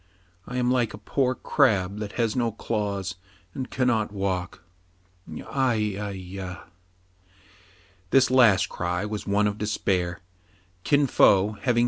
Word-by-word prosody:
" 85 +2 -35
I 125 - -3
am 125 0 +1
like 120 -5 +1
a - - -11
poor 130 +5 0
crab 105 -10 +1
that 105 -1 -5
has 115 -3 0
no 120 -2 +1
claws, 100 -3 -3 0.4
and 130 - -5
cannot 120 -5 0
walk. 95 -4 -3 0.8
Ai, 130 -3 +1 0.2
ai, 105 +1 -4
ya 95 0 -7
!'^ - - -13 1.5
This 130 +3 +4
last 105 -7 +5
cry 90 +1 -2
was 105 0 -5
one 100 +1 +2
of 105 0 -1
despair. 95 -5 -1 0.6
Kin 145 -1 +3
Fo, 100 -5 +4
having 120 -3 +2
105 Hz, 140 wpm, -25 LUFS, 95-125 Hz, 1.5 s, last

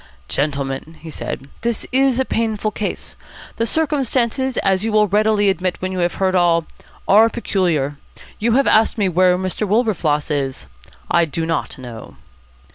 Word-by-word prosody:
"Gentlemen," 140 - -3
he 160 0 -8
said, 135 - -5
"this 235 -1 -2
is 265 -1 +2
a 265 - +1
painful 220 -3 -1
case. 210 -1 -4 0.4
The 230 - 0
circumstances, 265 -4 0
as 190 0 +2
you 225 - -1
will 210 0 +4
readily 210 +1 +2
admit 185 -2 0
when 185 0 -3
you 185 - -3
have 175 0 0
heard 190 -1 +1
all, 170 -2 +3 0.4
are 220 +3 +6
peculiar. 170 - -1 0.4
You 225 +1 +1
have 275 +2 +3
asked 220 +2 +3
me 205 -3 +2
where 180 +1 +3
Mr. 185 +3 -2
Wilberfloss 185 -9 +1
is. 135 -3 -2 0.5
I 170 -1 +4
do 160 +1 -3
not 165 -2 -2
know." 120 -4 -10
190 Hz, 160 wpm, -19 LUFS, 165-225 Hz, 0.5 s, are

